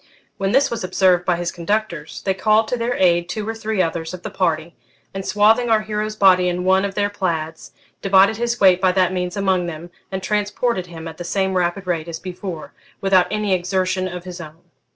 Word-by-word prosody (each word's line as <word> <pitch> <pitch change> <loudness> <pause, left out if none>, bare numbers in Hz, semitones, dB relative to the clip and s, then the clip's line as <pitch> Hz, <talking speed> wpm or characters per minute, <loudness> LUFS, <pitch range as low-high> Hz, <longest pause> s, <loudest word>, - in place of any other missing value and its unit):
When 195 0 0
this 275 +2 +3
was 230 -4 -3
observed 185 -1 +2
by 180 - +2
his 175 0 -3
conductors, 175 -3 -3
they 190 - +2
called 215 +3 +2
to - - 0
their 240 +1 -1
aid 175 -1 +2
two 215 +1 -4
or 225 - -2
three 220 -3 -1
others 165 +1 -3
of 180 - -13
the 215 - -5
party, 170 -3 -1 0.4
and, 195 0 -4
swathing 220 +4 +3
our 220 -1 +4
hero's 215 0 -3
body 185 -3 +5
in 180 0 -2
one 190 +1 +3
of 195 -1 -5
their 205 0 0
plaids, 165 -5 -3 0.3
divided 195 +2 +4
his 240 +1 -1
weight 185 -2 +5
by 185 -1 +3
that 185 -1 +2
means 180 +1 -3
among 190 -3 +1
them, 170 +1 -7 0.2
and 190 -1 -4
transported 210 -1 -1
him 165 -1 -9
at 160 -1 -9
the 175 - -6
same 190 +2 -1
rapid 180 +1 -1
rate 170 -3 -2
as 165 -1 -5
before, 180 -2 -7 0.3
without 190 -2 +3
any 210 -2 0
exertion 185 +1 0
of 180 -1 -7
his 180 -1 -8
own. 160 +1 -12
185 Hz, 215 wpm, -20 LUFS, 175-205 Hz, 0.4 s, body